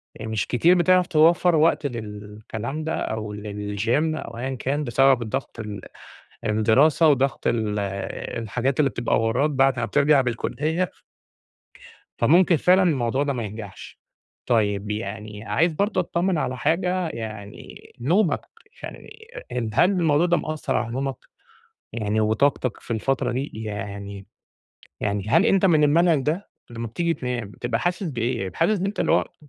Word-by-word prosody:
يعني، 110 - -6
مش 110 - -1
كتير 165 +9 +4
بتعرَف 180 0 +4
توفّر 170 +2 +4
وقت 155 -1 +3
للكلام 110 +3 -6
ده 160 +1 -2
أو 110 -1 -4
للgym 105 0 -5 0.3
أو 115 - -7
أيًا 130 +2 -3
كان 140 +4 -2
بسبب 135 0 +3
الضغط، 120 +2 -4
ال 105 -3 -6 0.6
الدراسة 115 +10 +4
وضغط 135 -1 +1
ال 110 -3 0 0.6
الحاجات 125 +5 -2
اللي 140 - +4
بتبقى 120 -2 0
وراك 125 +7 +1
بعد 135 -3 +2
ما - - 0
بترجَع 145 -1 +3
بالكُلّية 155 +8 -2 1.3
فممكن 170 +7 +4
فعلًا 185 +5 +4
الموضوع 135 -6 +1
ده 145 -1 0
ما 120 -3 -3
ينجَحش. 105 -1 -9 0.5
طيب، 105 -3 +1
يعني 105 0 -5
عايز 160 - +1
برضه 200 +4 0
أطّمن 175 0 0
على 130 -3 -2
حاجة، 180 +5 0
يعني 110 -6 -9
نومك، 175 - +2 0.4
يعني - - -9 0.4
أ 115 -3 -2
هل 175 - +4
الموضوع 170 -4 +2
ده 175 0 +3
مأثّر 155 -3 -2
على 115 - -2
نومك، 135 +1 -2 0.8
يعني 110 -1 -1
وطاقتك 110 +2 +1
في - - -9
الفترة 120 +3 0
دي؟ 135 +4 -3
يعني 100 -1 -6 0.7
يعني 100 0 -2
هل 165 - +4
أنت 195 -3 +3
من 160 -5 +4
المنهج 160 +1 +4
ده؟ 170 +7 -2 0.2
لمّا 115 -1 -5
بتيجي 170 +8 -1
تنام 125 -7 -4
بتبقى 115 +1 -3
حاسس 175 +2 -1
بإيه؟ 120 - -2
حاسس 215 -3 +2
إن 190 - -1
أنت 200 +1 -3
الوقت - - +1
130 Hz, 145 wpm, -23 LUFS, 110-160 Hz, 1.3 s, كتير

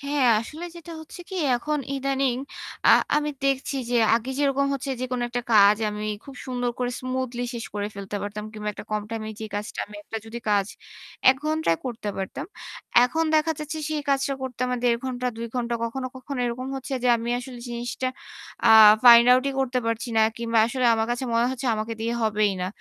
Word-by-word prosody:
হ্যাঁ 280 -2 +1
আসলে 310 +9 -8
যেটা 335 0 -10
হচ্ছে 315 +3 -11
কি 380 - -7 0.2
এখন 300 +4 -2 0.2
ইদানিং 270 -2 0 0.5
আ - - +8 0.3
আমি 300 0 0
দেখছি 275 0 0
যে 245 - +2 0.2
আগে 235 +3 -1
যেরকম 280 -1 +2
হচ্ছে 275 0 -4
যেকোনো 255 -1 -2
একটা 245 0 -3
কাজ 205 0 +7
আমি 210 0 -5 0.2
খুব 275 -1 -11
সুন্দর 245 -1 -1
করে 245 0 -1
স্মুথলি 255 -1 -3
শেষ 230 - -4
করে 205 0 -2
ফেলতে 200 +1 -5
পারতাম 205 +1 -5
কিংবা 210 -1 -5
একটা - - -9
কম 210 -1 -1
টাইম 225 -1 -4
এ - - -4
যেই 220 - -6
কাজটা 210 +1 -6
আমি 210 0 -11
একটা 225 - -6
যদি 235 +2 -6
কাজ 200 -1 +3 0.6
১ 265 - +1
ঘন্টায় 310 - +1
করতে 230 -4 -4
পারতাম। 195 - -5 0.6
এখন 320 +6 0
দেখা 315 +1 +3
যাচ্ছে 305 +1 -5
সেই 305 -1 -2
কাজটা 275 0 +1
করতে 255 -2 -6
আমার 250 0 -1
১.৫-২ 245 -1 -1
ঘণ্টা 240 -1 -1
কখনো, 255 +3 -3
কখনো 260 +1 -6
এরকম 250 +2 -4
হচ্ছে 270 +1 -7
যে - - +4
আমি 230 +1 -5
আসলে 250 -1 -8
জিনিসটা 240 +2 -3 0.6
আ - - +6 0.4
ফাইন্ড 235 0 +9
আউট 255 +1 +4
ই - - -5
করতে 255 -1 0
পারছি 230 +1 -2
না। - - +5 0.2
কিংবা 230 -1 0
আসলে 250 +1 0
আমার 220 0 0
কাছে 245 +2 -1
মনে 235 +1 +3
হচ্ছে 260 0 -4
আমাকে 215 +1 -3
দিয়ে 230 +1 -1
হবেই 210 -2 +2
না। - - -1
245 Hz, 195 wpm, -25 LUFS, 225-270 Hz, 0.6 s, ফাইন্ড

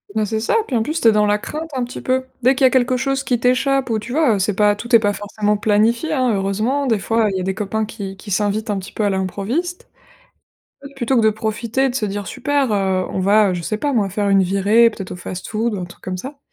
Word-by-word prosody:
Bah 215 -1 +1
c'est 220 +1 -2
ça 230 - 0
et - - -1
puis 265 - -3
en 225 - +2
plus, 310 +8 -2
tu - - +4
es - - +8
dans 210 -1 +2
la 205 0 +2
crainte 310 +9 -6
un 255 - 0
petit 245 - -7
peu. 260 0 0 0.2
Dès 260 +2 +4
qu'il 265 0 +3
y - - +9
a - - +1
quelque 255 -1 +2
chose 270 +1 -1
qui 245 -3 0
t'échappe 255 +1 +1
ou, 220 - +1
tu 215 +3 -8
vois? 290 -7 +3
Heu, - - -2
c'est 195 +1 0
pas, 210 0 +3
tout 235 +3 +1
est - - +8
pas 205 -2 +1
forcément 210 +1 -1
planifié, 220 +8 +1
hein. 255 -4 +1
Heureusement, 215 +8 0
des 225 -3 +2
fois, 225 +2 +1
il 190 - -2
y - - -2
a - - -2
des 190 +1 -1
copains 215 +2 -2
qui 200 -3 -7
qui 205 +2 -10
s'invitent 210 +3 0
un 200 - -1
petit 190 - -9
peu 215 - -3
à 205 - +2
l'improviste. 210 - -3 1.1
Plutôt 260 0 0
que - - +5
de 220 - +4
profiter 220 +4 -2
et - - +3
de - - -8
se 225 -5 -1
dire: 205 0 -4
«Super, 270 0 -1
heu, 190 -2 0
on - - -2
va, 200 +1 +4
je 175 - -3
sais 170 +6 -2
pas 285 +6 -1
moi, 215 -6 +1
faire 205 +2 -1
une 195 -1 +5
virée 200 +5 +4
peut-être 195 -4 -8
au - - -6
fast-food, 215 +5 -3
ou - - -3
un - - -3
truc 175 - -14
comme 185 0 -4
ça». 270 +8 -8
220 Hz, 285 wpm, -19 LUFS, 200-255 Hz, 1.1 s, y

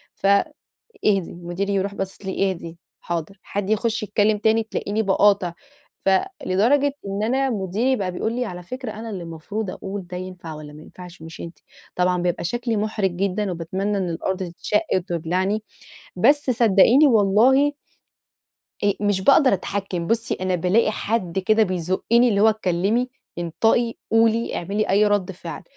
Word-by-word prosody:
ف - - -8 0.8
إهدي، 195 -4 +2
مديري 175 +3 -3
يروح 200 +1 -1
باصص 195 +1 -5
لي، 195 0 0
إهدي، 165 -2 -8 0.2
حاضر، 170 +3 -4
حد 200 -1 -4
يخش 220 +1 0
يتكلم 210 0 +2
تاني، 220 +1 +2
تلاقيني 215 0 -2
باقاطع، 195 -3 +3 0.5
ف - - +4 0.4
لدرجة 270 +10 +2
إن 200 +1 -2
أنا 265 +4 +1
مديري 215 +5 0
بقى 190 -6 -2
بيقول 220 +5 -2
لي 250 +1 -1
على 180 -5 -7
فكرة 255 +5 -6
أنا 220 +2 -7
اللي 190 -4 -5
المفروض 170 +6 -5
أقول 195 -1 -6
ده 180 0 -6
ينفع 180 -3 -7
والّا 150 -1 -10
ما 150 - -12
ينفعش، 180 -2 -12
مش 160 +1 -9
أنتِ، 170 0 -8 0.4
طبعًا 180 0 +1
بيبقى 175 -1 -1
شكلي 235 +4 -1
محرج 210 -3 0
جدًا، 195 +1 -1
وباتمنى 190 +5 -2
إن 185 -3 -1
الأرض 180 +3 -2
تتشق 180 +4 -1
وتبلعني، 185 +4 -1 0.5
بس 280 +8 +3
صدقيني 235 +4 +5
والله 240 +6 +4 1.1
آآ 200 - +4
مش 205 -2 +1
باقدر 275 +4 +5
أتحكم، 190 -2 -3
بُصي 230 +2 0
أنا 185 0 -2
بالاقي 185 +6 +2
حد 195 -5 -2
كده 215 +4 +3
بيزُقّني، 185 +6 +2
اللي 200 -3 +1
هو 220 - +6
اتكلمي، 215 +4 0 0.3
انطقي، 225 +7 +1 0.2
قولي، 225 +1 +2
اعملي 200 +5 -2
أي 205 +2 +4
رد 205 -2 0
فعل، 170 -3 -8
200 Hz, 155 wpm, -22 LUFS, 180-220 Hz, 1.1 s, هو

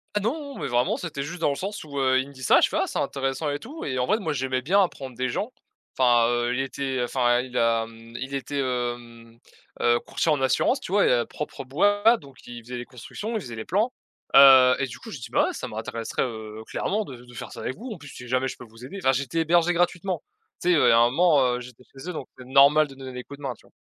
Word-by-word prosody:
Ah 210 - +1
non! 280 +5 -3
Mais - - -4
vraiment, 120 0 +1
c'était 155 -5 -5
juste 170 +6 -6
dans 165 - +2
le - - -2
sens 200 +6 -5
où, 140 -2 -5
heu, 130 -1 +3
il 130 - -2
me 140 - -13
dit 130 - -14
ça, - - +5
je - - +5
fais: - - -2
«Ah - - 0
c'est - - -4
intéressant 135 +2 -1
et 145 - -3
tout», 290 - -8
et 130 -3 -2
en 125 - 0
vrai, 215 - +3
moi 160 -7 -2
j'aimais 130 -2 -1
bien 195 +8 +4
apprendre 135 -9 -3
des 130 +1 -1
gens. 215 - -3 0.4
Enfin, 120 -2 +4
heu, 120 0 0
il 135 - 0
était, 135 -1 -3
enfin, 120 0 +2
il 125 -1 -10
a, 115 -1 +2
mmh, 115 +1 -14
il 130 +2 -6
était, 140 +1 -3
hem, 120 -3 -4 0.4
heu, 120 0 +4
courtier 160 - -1
en 145 -3 +1
assurance, 130 - +2
tu - - -8
vois? 205 - +4
Et - - +4
à 120 -1 +2
propre 150 - -6
bois, 205 - +3
donc 140 -6 -16
il 120 -1 -9
faisait 125 +2 -6
les 120 - -6
constructions, 205 - -7
il 220 - -1
faisait 120 -8 -8
les 110 - -6
plans. 215 +7 +1 0.4
Heu, 130 -2 +9
et 135 - 0
du 125 - -9
coup, - - -11
j'ai - - -7
dit: - - -8
«Bah - - +3
ouais - - -2
ça - - -5
m'intéresserait, 115 -1 -3
heu, 110 -3 -6
clairement 210 - -2
de 135 - -9
de 120 - -15
faire - - -7
ça - - -9
avec 130 - -4
vous. 245 +2 -7
En 210 - -6
plus, 145 - -12
si 125 -2 -10
jamais 130 +1 +1
je - - -6
peux 125 - -11
vous 115 +1 -16
aider». 195 - -8
Enfin 135 - +5
j'étais 140 +4 -1
hébergé 170 +2 +3
gratuitement. 175 +2 0 0.4
Tu 180 - 0
sais, - - +5
heu, 150 - +4
il - - +6
y - - +6
a 115 - +6
un 120 +1 +5
moment, 165 +1 +4 0.2
heu, - - -4
j'étais 125 0 -12
chez 135 +6 -10
eux, 180 - -4
donc 135 - -6
c'est 125 - -10
normal 140 +4 +5
de 135 - -13
donner 130 -1 -8
des 125 - -6
coups 140 - -11
de 145 - -14
main, 135 -2 -2
tu - - -22
vois. - - -26
135 Hz, 285 wpm, -25 LUFS, 125-165 Hz, 0.4 s, Heu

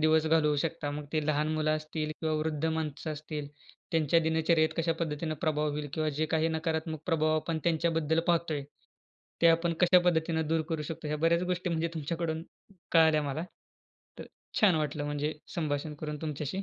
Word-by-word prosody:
दिवस 155 0 +4
घालवू 155 -2 +3
शकता. 155 0 -2
मग 150 +1 -5
ते 155 -1 0
लहान 150 0 +1
मुलं 155 0 +1
असतील 155 0 -4
किंवा 160 -1 0
वृद्ध 155 0 -2
माणसं 160 -1 -2
असतील 150 -1 -6 0.4
त्यांच्या 165 0 +3
दिनचर्येत 160 0 +3
कशा 165 0 +1
पद्धतीनं 155 0 -2
प्रभाव 150 -1 +1
होईल? 145 0 -4
किंवा 155 -1 0
जे 155 - +2
काही 160 0 +2
नकारात्मक 160 -1 -2
प्रभाव 155 -2 +2
आपण 160 +1 -1
त्यांच्याबद्दल 165 -1 +2
पाहतोय, 165 -4 +1 0.8
ते - - +8
आपण 165 +1 +3
कशा 180 0 +7
पद्धतीनं 160 -2 +1
दूर 160 0 +2
करू 160 -3 -2
शकतो? 155 0 -5
ह्या 150 - -1
बऱ्याचं 170 +3 +2
गोष्टी 180 0 -1
म्हणजे 165 0 0
तुमच्याकडून 160 +1 -2 0.5
कळाल्या 160 -2 +5
मला. 145 +3 -3 0.7
तर - - -6 0.4
छान 200 -5 +6
वाटलं 150 -1 -1
म्हणजे 145 +1 -1 0.2
संभाषण 150 -2 -2
करून 150 -1 -3
तुमच्याशी. 150 +4 -3
160 Hz, 170 wpm, -30 LUFS, 150-165 Hz, 0.8 s, ते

